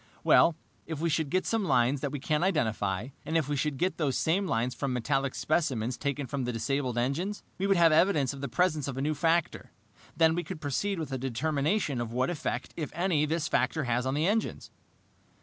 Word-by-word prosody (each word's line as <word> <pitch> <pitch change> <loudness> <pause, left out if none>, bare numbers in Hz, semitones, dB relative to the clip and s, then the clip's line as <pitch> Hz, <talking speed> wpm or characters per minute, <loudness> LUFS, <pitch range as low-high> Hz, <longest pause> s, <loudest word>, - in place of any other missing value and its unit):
"If 160 -3 -4
we 170 +1 0
should 155 -1 0
get 185 +3 0
some 225 -2 0
lines 130 -3 +2
that 140 - -2
we 145 - -4
can't 150 +3 0
identify, 110 - 0
and 160 +2 0
if 155 -4 0
we 145 - -1
should 145 0 -1
get 180 +5 0
those 145 -5 0
same 185 +5 +1
lines 120 -2 0
from 140 -2 -2
metallic 135 +2 0
specimens 130 -7 0
taken 140 0 -2
from 135 +1 -3
the 125 - -1
disabled 125 +1 -1
engines, 160 +12 -1 0.2
we 195 - +1
would 195 -1 +3
have 170 -1 +6
evidence 155 -4 +3
of 135 - -9
the 140 - -2
presence 150 +2 +1
of 135 -2 -4
a - - -1
new 155 +2 +1
factor. 165 +1 0 0.5
Then 160 -1 +5
we 175 +1 -1
could 185 -3 -7
proceed 155 +7 -1
with 155 -4 -4
a 130 - -2
determination 140 - 0
of 115 -1 -4
what 130 +6 0
effect, 155 -3 -4
if 155 -3 -4
any, 170 -4 +1
this 160 0 -1
factor 150 +3 +1
has 125 0 0
on 130 - 0
the 155 +2 +1
engines." 215 +4 -1
145 Hz, 215 wpm, -29 LUFS, 130-165 Hz, 0.5 s, have